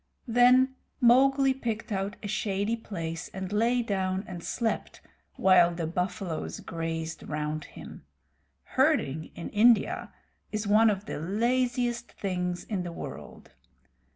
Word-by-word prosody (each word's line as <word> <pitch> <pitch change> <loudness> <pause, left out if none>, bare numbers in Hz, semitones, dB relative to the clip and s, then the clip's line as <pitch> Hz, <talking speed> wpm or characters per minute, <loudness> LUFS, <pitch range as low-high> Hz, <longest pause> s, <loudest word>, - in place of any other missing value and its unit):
Then 250 +2 +5 0.3
Mowgli 270 +2 +5
picked 230 -4 -4
out 195 0 -2
a - - -3
shady 205 +1 -1
place, 165 -6 -5
and 190 +1 -4
lay 235 +3 +2
down 190 -3 -1
and 175 -2 -7
slept 230 -2 -2 0.4
while 175 -2 +5
the 170 -1 -2
buffaloes 180 0 -3
grazed 165 -1 -4
round 150 0 -3
him. - - -11 0.6
Herding 155 +4 +1
in 170 - -6
India 220 0 +3 0.4
is 215 0 -2
one 215 +2 +5
of 200 -1 -2
the - - -5
laziest 240 +6 0
things 180 -2 -3
in 200 -4 -3
the 175 -1 -5
world. - - -9
200 Hz, 125 wpm, -28 LUFS, 175-235 Hz, 0.6 s, Then